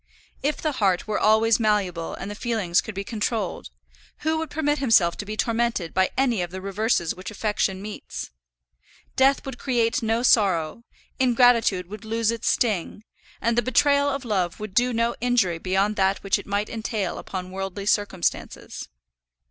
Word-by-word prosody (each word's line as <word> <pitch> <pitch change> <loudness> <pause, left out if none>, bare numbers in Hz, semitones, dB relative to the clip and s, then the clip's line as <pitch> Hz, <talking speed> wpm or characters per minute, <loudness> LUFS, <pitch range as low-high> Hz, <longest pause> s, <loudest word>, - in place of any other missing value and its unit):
If 295 +2 -1
the 310 - -1
heart 195 -9 +1
were 215 - -1
always 220 +1 +4
malleable 200 -6 0
and 195 - -6
the - - -4
feelings 210 -6 0
could 220 - -8
be 195 - -3
controlled, 215 - -3 0.5
who 315 +1 0
would 320 -1 -4
permit 295 -1 0
himself 220 -10 +4
to 205 - -5
be 215 +1 -5
tormented 230 -7 0
by 190 0 +2
any 245 -7 +2
of 175 - -3
the 190 +2 -7
reverses 195 -2 0
which 185 +1 -8
affection 205 -2 -1
meets? 210 0 -7 0.8
Death 270 +1 +3
would 265 -2 -7
create 235 -3 +1
no 225 +1 0
sorrow; 195 -3 +2 0.3
ingratitude 240 -7 +4
would 210 +3 -9
lose 225 0 0
its 230 -1 -1
sting; 210 -3 0 0.4
and 235 0 +1
the 240 - +3
betrayal 280 +3 +3
of 275 -2 -3
love 185 -6 -1
would 215 -2 -6
do 245 +3 +3
no 230 0 +1
injury 230 -9 +1
beyond 195 +4 0
that 190 0 +1
which 195 - +1
it - - -11
might 205 +1 -1
entail 220 -3 -3
upon 185 -1 -6
worldly 195 +1 -5
circumstances. 205 -4 -2
215 Hz, 170 wpm, -24 LUFS, 190-240 Hz, 0.8 s, always